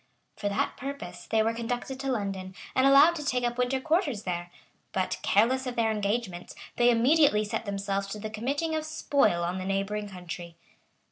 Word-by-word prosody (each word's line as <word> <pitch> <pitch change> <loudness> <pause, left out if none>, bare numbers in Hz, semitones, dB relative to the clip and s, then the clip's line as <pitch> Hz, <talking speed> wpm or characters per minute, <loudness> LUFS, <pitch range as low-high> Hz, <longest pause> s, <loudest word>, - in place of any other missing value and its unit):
For 205 -2 -2
that 200 - -1
purpose, 270 -10 -7
they 220 -1 +3
were 225 +1 +1
conducted 245 +3 -4
to 270 0 -1
London, 195 -5 -3 0.2
and 260 +1 +4
allowed 280 +5 +7
to 300 - -5
take 250 -3 0
up 240 0 -1
winter 250 +2 +1
quarters 300 - 0
there; 175 -1 -3 0.4
but, 185 -1 -1
careless 255 +6 +2
of 250 - -4
their 225 -1 +2
engagements, 205 -3 -2 0.2
they 240 0 +4
immediately 245 -2 +4
set 210 - -3
themselves 200 -1 -2
to 210 +2 -6
the 215 +1 -5
committing 280 +9 -2
of 315 -1 -1
spoil 280 - +1
on 180 +2 -2
the - - -4
neighboring 195 +2 -2
country. 175 -2 -8
220 Hz, 185 wpm, -28 LUFS, 195-260 Hz, 0.4 s, allowed